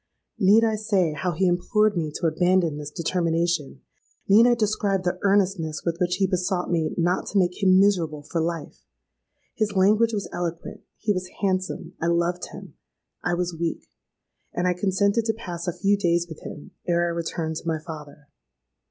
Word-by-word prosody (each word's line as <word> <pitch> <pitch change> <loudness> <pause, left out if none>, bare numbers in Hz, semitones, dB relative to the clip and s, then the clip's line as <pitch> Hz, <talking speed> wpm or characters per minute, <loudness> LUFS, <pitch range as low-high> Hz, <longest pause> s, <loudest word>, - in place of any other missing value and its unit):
Need 205 +4 +5
I 220 -1 +2
say 195 -7 +1
how 175 +4 -2
he 185 +4 +1
implored 205 +4 +2
me 160 -3 -1
to - - -2
abandon 170 -1 +2
this 150 -1 -6
determination? 165 - -1 0.5
need 220 +4 +7
I 240 - +4
describe 205 -3 0
the 180 0 -1
earnestness 190 -6 +1
with 170 0 -1
which 180 0 +2
he 195 - +2
besought 185 -1 -1
me 165 -2 0
not 175 +1 +1
to 205 - -1
make 180 +1 +1
him 185 -1 +5
miserable 170 -7 +2
for 165 +2 -2
life? 165 -2 -4 0.7
His 210 -2 -1
language 210 +4 +4
was 205 -4 -3
eloquent—he 175 +5 -4
was 185 -1 -4
handsome—I 185 -3 -2
loved 170 +1 0
him—I 175 - -7
was 175 0 -2
weak—and 170 +1 -6
I 180 - +3
consented 200 +4 +1
to 225 - +1
pass 175 -6 -6
a - - +2
few 200 +1 +3
days 170 -3 +1
with 160 -2 -9
him 150 - -9 0.2
ere 170 -1 +2
I - - 0
returned 165 -1 -3
to - - -8
my 160 -1 +1
father. 150 -2 -10
180 Hz, 170 wpm, -24 LUFS, 165-195 Hz, 0.7 s, need